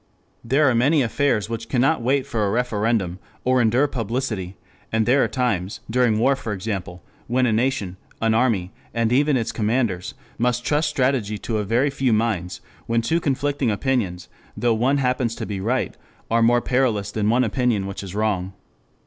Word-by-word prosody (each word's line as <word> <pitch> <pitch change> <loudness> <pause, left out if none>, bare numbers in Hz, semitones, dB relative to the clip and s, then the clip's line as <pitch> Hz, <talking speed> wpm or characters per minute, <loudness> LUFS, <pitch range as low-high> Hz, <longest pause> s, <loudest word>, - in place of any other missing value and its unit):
There 140 +5 +3
are 130 - +4
many 135 +5 +3
affairs 115 -2 +1
which 115 0 -5
cannot 135 +2 +2
wait 130 +3 +1
for 110 -2 -1
a 100 - +1
referendum 110 -5 0 0.2
or 130 0 +3
endure 120 +5 +3
publicity, 115 -7 -3 0.3
and 110 0 +1
there 130 +3 +4
are - - +2
times, 105 -8 -1
during 120 -3 +3
war 130 +5 +3
for 115 -5 -5
example, 95 -3 -5 0.2
when 125 +2 +2
a 115 - +2
nation, 110 -6 -1 0.2
an 115 0 +2
army, 110 -6 +1 0.2
and 115 0 +1
even 145 +1 +3
its 115 -2 -2
commanders 110 -5 -1 0.2
must 125 0 0
trust 150 +1 +1
strategy 125 -7 0
to 110 +1 -2
a - - -1
very 120 +7 +1
few 135 -3 +1
minds; 105 -5 -1 0.3
when 115 0 +1
two 165 +8 +1
conflicting 140 -3 0
opinions, 105 -5 -1 0.3
though 120 -1 +2
one 125 +6 +2
happens 125 -3 0
to - - -5
be 100 -2 -4
right, 125 +5 -1 0.4
are 115 0 +3
more 120 +1 +4
perilous 120 -6 0
than 105 -1 0
one 125 +3 +3
opinion 115 -3 0
which 100 0 -5
is 95 -1 -8
wrong. 100 -3 -1
115 Hz, 180 wpm, -22 LUFS, 105-130 Hz, 0.4 s, are